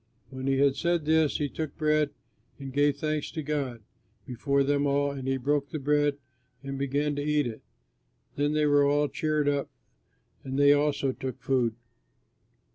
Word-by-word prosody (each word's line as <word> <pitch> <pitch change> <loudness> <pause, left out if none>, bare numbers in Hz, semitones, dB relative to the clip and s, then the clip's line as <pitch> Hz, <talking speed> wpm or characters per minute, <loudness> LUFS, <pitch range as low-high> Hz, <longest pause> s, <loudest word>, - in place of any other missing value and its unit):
When 130 0 -5
he 135 0 +2
had 140 0 +3
said 170 -2 0
this, 160 -1 +3
he 145 - -1
took 155 0 -5
bread, 155 -1 +2 0.5
and 135 -1 -8
gave 145 0 +2
thanks 155 0 -2
to 160 -2 -4
God 135 -6 -3 0.4
before 140 +3 0
them 145 +1 +1
all, 140 0 +1
and 135 -2 -6
he 135 0 +1
broke 140 +2 0
the - - -4
bread 145 0 +1 0.5
and 135 0 -5
began 140 +2 0
to - - -1
eat 150 -1 +1
it. 115 -2 -6 0.7
Then 145 +1 0
they 150 0 +2
were 145 -1 +4
all 145 +1 +2
cheered 155 -2 0
up 140 -1 0 0.7
and 135 0 -4
they 145 0 +6
also 145 -2 +1
took 130 -1 -6
food. 125 -4 0
145 Hz, 175 wpm, -28 LUFS, 135-150 Hz, 0.7 s, they